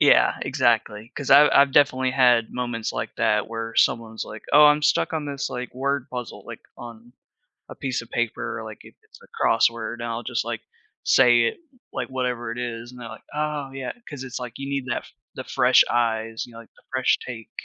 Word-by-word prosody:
Yeah, - - +5
exactly. 115 0 0
'Cause 140 - -4
I 145 +2 +8
I've 140 -1 +5
definitely 130 -3 +3
had 125 -3 +4
moments 120 -3 -3
like - - -4
that, 105 -1 +1
where 115 0 -5
someone's, 110 -1 +1
like, 110 - -10
"Oh, 150 +1 +8
I'm 150 0 +4
stuck 150 - +2
on 155 -2 -2
this, 140 -2 -3
like, 125 0 -6
word 140 0 -1
puzzle," 125 -2 -7
like - - -8 0.2
on 120 0 -11 0.6
a - - -9
piece 130 -3 -3
of 115 - -15
paper, 120 -1 -2
like, 110 -1 -9
if - - -15
it's - - -19
a - - -18
crossword, 115 0 +2
and 120 0 -7
I'll 115 0 -3
just, - - -2
like, - - -4 0.4
say 120 -2 +5
it, 115 - -1 0.3
like, - - -3
whatever 125 -3 -3
it 120 - -7
is, 120 0 -5
and 125 - -12
they're 115 - -7
like, 110 - -11
"Oh 150 -2 -2
yeah." 135 -2 -5 0.2
Cause 135 -3 -7
it's 130 -1 -6
like, 125 -2 -7
you 140 0 -5
need 140 -2 -2
that 125 - -3 0.3
the - - -6
fresh - - +5
eyes, 115 -1 0
you 120 - -16
know, 115 - -11
like, 115 - -17
the - - -23
fresh 130 -1 +2
take 115 -3 -8
120 Hz, 210 wpm, -24 LUFS, 115-135 Hz, 0.6 s, I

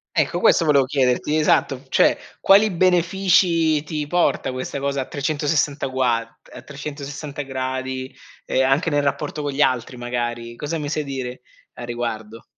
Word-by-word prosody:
Ecco, 165 +2 +1
questo 170 - +4
volevo 140 -4 +4
chiederti, 130 +2 +1
esatto, 140 -3 +2
cioè - - +4 0.2
quali 205 +2 +5
benefici 175 -3 +3
ti 150 -1 -3
porta 175 -5 +1
questa 130 +2 -5
cosa 140 -1 -1
a - - -4
360 145 0 -1
guad 125 -3 0 0.2
a - - -10
360 145 0 -7
gradi, 130 0 -4 0.3
e 130 - +1
anche 135 +6 +2
nel 145 -1 +1
rapporto 145 +1 -2
con 145 - -2
gli 140 - -4
altri, 130 -2 +1
magari, 120 -1 -4
cosa 155 +4 -3
mi 150 -1 -4
sai 150 0 -2
dire 130 -2 -5 0.3
a 120 - -8
riguardo? 115 -2 -5
140 Hz, 155 wpm, -22 LUFS, 130-155 Hz, 0.3 s, quali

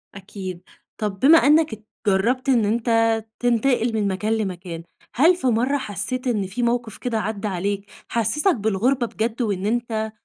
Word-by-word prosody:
أكيد، 190 -2 -7 0.4
طَب 205 -3 -3
بما 305 +8 +7
إنك 305 -3 +4
ات 215 0 -10 0.2
جرّبت 245 +8 +1
إن 235 -5 +4
أنت 230 +3 0 0.5
تنتقل 245 -1 +1
من 215 -2 0
مكان 205 +3 -1
لمكان، 180 -6 -4 0.3
هل 325 +8 +5
في 265 - -2
مَرّة 250 +4 +2
حسّيت 230 +3 -4
إن 210 -5 0
في 225 +6 -3
موقِف 235 -2 -1
كده 235 -3 -2
عدّى 210 -1 -3
عليك 200 +1 -3 0.2
حسّسك 300 - +1
بالغُربة 230 +4 +1
بجد 225 +2 -3
وإن 200 -4 -1
أنت 220 -1 -1
220 Hz, 160 wpm, -22 LUFS, 200-245 Hz, 0.5 s, بما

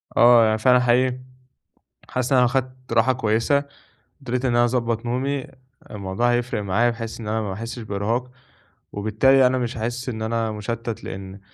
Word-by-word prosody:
آه، 120 -1 +7
يعني 110 0 +2
فعلًا 125 +3 +4
حقيقي 125 +1 +2 0.9
حاسس 130 +1 -2
إن 130 - +5
أنا 125 - +5
لو - - +2
خدت 130 -1 -3
راحة 115 +3 +4
كويسة، 120 +4 +1 0.6
قدرت 125 0 -2
إن 120 -2 +1
أنا 120 - +4
أضبّط 115 -1 -1
نومي 130 +3 -2 0.4
الموضوع 105 +4 -1
هيفرق 120 -3 -1
معايا 105 +5 +2
بحيث 115 -1 -6
إن 110 - -7
أنا 110 +1 -1
ما 100 -3 -4
أحسّش 115 +4 -6
بإرهاق 110 +4 -2 0.6
وبالتالي 120 +6 +3
أنا 130 +1 0
مش 120 -1 -3
هاحس 120 +3 -3
إن 110 -3 -5
أنا 115 0 -1
مُشتَّت 115 +2 -5
لإن 95 +1 -8
120 Hz, 170 wpm, -22 LUFS, 110-125 Hz, 0.9 s, آه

